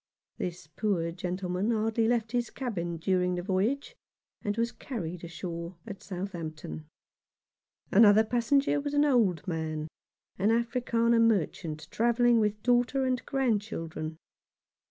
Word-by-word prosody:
This 175 -3 -4
poor 170 +1 -1
gentleman 180 +3 -2
hardly 225 0 +1
left 230 -2 +1
his 240 -1 0
cabin 175 -10 -3
during 180 +1 +1
the 175 - -3
voyage, 205 +9 0 0.5
and 205 +1 -2
was 235 +1 +1
carried 180 - -6
on 170 - -6
shore 170 0 -6
at 200 -3 -8
Southampton. 160 - -6 1.0
Another 215 +1 +7
passenger 260 +6 +2
was 290 0 -3
an 290 +1 +5
old 210 - +2
man, 160 -2 -2 0.5
an 200 +3 +3
Afrikander 235 0 +2
merchant, 170 -7 0
travelling 235 +1 +3
with 210 -1 0
daughter 245 +2 +2
and 255 -1 0
grandchildren. 200 - -2
210 Hz, 125 wpm, -29 LUFS, 175-235 Hz, 1.0 s, Another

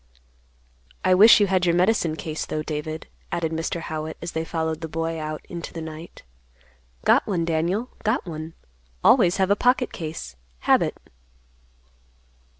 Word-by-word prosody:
"I 185 - +5
wish 215 +5 +8
you 205 - +5
had 185 -2 +1
your 170 - +3
medicine 175 -3 +2
case, 155 -1 -4
though, 155 - -3
David," 155 +1 -4 0.3
added 165 -2 -1
Mr. 165 +1 -2
Howitt, 155 -1 -5
as 170 - -5
they 160 - -2
followed 160 -1 -2
the 160 - -4
boy 165 +1 -3
out 155 0 -5
into 170 -1 -7
the 165 - -5
night. 160 +1 -9 0.8
"Got - - +4
one, 175 -5 0
Daniel; 170 +9 -1
got 215 +3 0
one. 160 -1 -7 0.5
Always 195 -8 +5
have 190 0 +2
a - - +6
pocket 250 +3 +2
case; 155 - -6 0.3
habit." - - +2
165 Hz, 150 wpm, -24 LUFS, 160-185 Hz, 0.8 s, wish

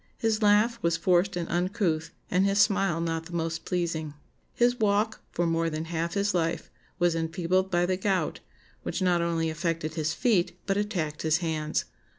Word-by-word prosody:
His 225 -1 0
laugh 215 +3 +4
was 170 0 +1
forced 180 +2 +2
and 170 -1 -2
uncouth, 175 -3 0 0.2
and 185 +1 +3
his 200 0 +2
smile 195 -5 +3
not 165 -1 -2
the 175 - -11
most 165 -1 -2
pleasing. 165 -4 -2 0.4
His 245 +1 +2
walk, 215 +1 +1
for 175 - 0
more 165 0 +1
than 155 0 -4
half 170 +1 -2
his 200 +1 +1
life, 165 -2 -1 0.3
was 175 -1 +3
enfeebled 175 +3 0
by 175 -1 +2
the 185 +1 0
gout, 190 -1 0 0.4
which 190 - -3
not 175 -2 +3
only 165 -1 0
affected 165 -1 -2
his 155 -2 -1
feet, 200 -8 +1
but 195 - +1
attacked 180 -8 -2
his 160 0 +2
hands. 155 -3 -1
175 Hz, 175 wpm, -27 LUFS, 165-195 Hz, 0.4 s, laugh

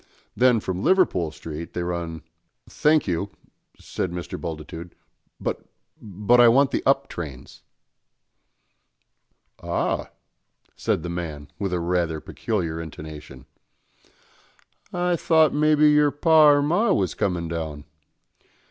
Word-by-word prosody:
Then 125 -2 +4
from 95 -2 -4
Liverpool 165 - +2
Street 80 +1 -8
they 90 - -2
run 85 -2 -4 0.2
" - - -52
"Thank 155 0 +2
you," 90 +3 -1 0.5
said 95 - -4
Mr. 90 -2 -6
Bultitude, 80 +1 -7 0.4
"but - - -3 0.4
but 105 +4 +2
I 120 - +8
want 135 +4 +4
the - - 0
up 135 0 +3
trains." 70 -7 -8 2.0
"Ah," - - -2 0.7
said 80 - -1
the 85 - -4
man, 80 -5 -5
with 100 -2 -2
a 90 - 0
rather 85 -2 -1
peculiar 85 -4 -3
intonation, 75 -4 -10 1.5
"I 180 0 0
thought 160 -1 +3
maybe 150 0 +4
your 150 0 +4
par 150 0 +5
or - - +2
mar 175 +10 +2
was 95 -3 0
comin' 90 -4 -1
down. 80 -3 -5
90 Hz, 120 wpm, -24 LUFS, -, 2.0 s, I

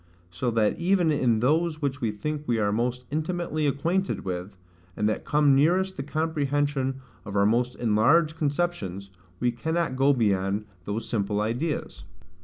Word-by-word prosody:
So 120 +8 -2
that 110 -2 +1
even 175 -2 +3
in 120 -7 +2
those 155 +4 +1
which 140 -2 -2
we 115 - +1
think 150 +8 -4
we 120 - +1
are 105 -2 +1
most 125 +3 -1
intimately 155 -1 -1
acquainted 170 - -1
with, 90 +1 -5 0.4
and 105 - +1
that 110 - -2
come 145 -1 +4
nearest 180 +7 +3
the - - -4
comprehension 145 -3 -1 0.2
of 100 -2 -7
our 100 0 +4
most 120 +3 +1
enlarged 125 +9 +3
conceptions, 140 - -2 0.3
we 120 0 +2
cannot 160 +3 -1
go 135 +2 +4
beyond 100 -4 +1 0.2
those 105 +3 -3
simple 105 -2 -1
ideas. 120 - -2
135 Hz, 155 wpm, -26 LUFS, 110-155 Hz, 0.4 s, come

